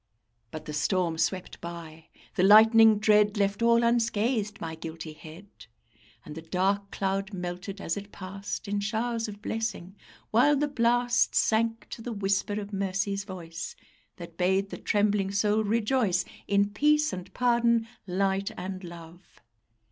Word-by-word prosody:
But 155 - -8
the 150 - -6
storm 165 +1 0
swept 185 +1 -2
by; 165 -2 -9 0.3
the - - 0
lightning 220 +2 +7
dread 210 0 +3
Left 200 +1 0
all 235 0 +4
unscathed 230 -2 0
my 165 -1 -5
guilty 160 -1 -7
head, 160 +5 -12 0.8
And 150 - -8
the 160 - -7
dark 195 +4 -1
cloud 195 +1 -2
melted 180 +2 -5
as 165 - -2
it 200 0 -8
passed 195 +2 -6
In 205 0 -1
showers 225 +2 -2
of 205 0 -10
blessing, 220 -5 -4 0.4
while 255 +7 +5
the 295 +1 +1
blast 245 -2 +2
Sank 225 +1 +1
to - - -8
the 235 +1 -5
whisper 200 0 -1
of 205 0 -8
mercy's 195 +1 -2
voice, 175 -4 -7 0.4
That 170 -1 -10
bade 190 +2 +1
the - - -5
trembling 205 -2 +1
soul 210 +2 +1
rejoice 215 -3 +1 0.2
In 200 0 +2
peace 300 +7 +2
and 180 -1 -7
pardon, 235 -2 +2 0.2
light 195 +1 0
and 185 +1 -6
love. 170 +1 -12
200 Hz, 150 wpm, -27 LUFS, 185-225 Hz, 0.8 s, lightning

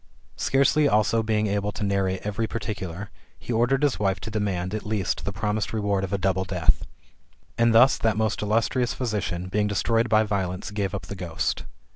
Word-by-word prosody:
Scarcely 140 +2 +3
also 110 -1 +3
being 110 -1 +1
able 100 0 -1
to 105 - -4
narrate 95 -2 0
every 105 +2 -1
particular, 100 -4 -5 0.3
he 120 - -5
ordered 120 +5 +2
his 145 -3 +2
wife 95 -2 +1
to 110 - -6
demand, 100 -3 -2
at 110 - -3
least, 105 -4 -2
the 100 - -2
promised 105 +2 -2
reward 100 -3 0
of 95 - -3
a 100 - +1
double 95 -1 +1
death.^^ 90 -4 +1 0.7
And 115 0 +3
thus 120 +4 +6
that 110 -2 +1
most 110 -1 0
illustrious 115 +4 +1
physician, 105 -7 -2
being 105 +2 0
destroyed 115 +3 +1
by 110 0 +5
violence, 95 -2 -2
gave 100 -1 -2
up 100 - -5
the - - -7
ghost. 85 -4 -2
105 Hz, 185 wpm, -25 LUFS, 95-110 Hz, 0.7 s, thus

